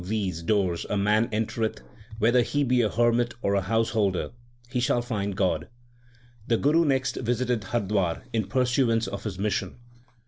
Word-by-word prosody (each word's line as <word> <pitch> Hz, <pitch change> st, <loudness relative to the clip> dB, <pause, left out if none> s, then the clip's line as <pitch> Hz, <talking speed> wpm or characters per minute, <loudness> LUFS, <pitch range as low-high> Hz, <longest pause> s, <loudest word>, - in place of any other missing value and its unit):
50 90 Hz, -, -9 dB
THE 110 Hz, -, 0 dB
SIKH 105 Hz, -2 st, 0 dB
RELIGION 85 Hz, 0 st, -8 dB
doors 95 Hz, -5 st, +1 dB
a 105 Hz, -, 0 dB
man 105 Hz, +3 st, +2 dB
entereth, 110 Hz, +1 st, -2 dB, 0.4 s
whether 120 Hz, +3 st, +4 dB
he 145 Hz, +4 st, 0 dB
be 125 Hz, -2 st, +2 dB
a 110 Hz, -, +2 dB
hermit 120 Hz, +1 st, +1 dB
or 100 Hz, -, +1 dB
a 100 Hz, -, +2 dB
householder, 105 Hz, -2 st, 0 dB, 0.4 s
he 125 Hz, 0 st, -2 dB
shall 120 Hz, 0 st, +1 dB
find 100 Hz, -5 st, -3 dB
God/ 85 Hz, -4 st, 0 dB, 0.8 s
The 115 Hz, -, +3 dB
Guru 155 Hz, +6 st, +3 dB
next 130 Hz, -2 st, 0 dB
visited 120 Hz, -2 st, -1 dB
Hardwar 100 Hz, -5 st, -1 dB
in 110 Hz, -4 st, 0 dB
pursuance 120 Hz, -1 st, +2 dB
of 100 Hz, +2 st, -6 dB
his 100 Hz, -4 st, -4 dB
mission. 100 Hz, -2 st, -2 dB
110 Hz, 175 wpm, -26 LUFS, 100-120 Hz, 0.8 s, whether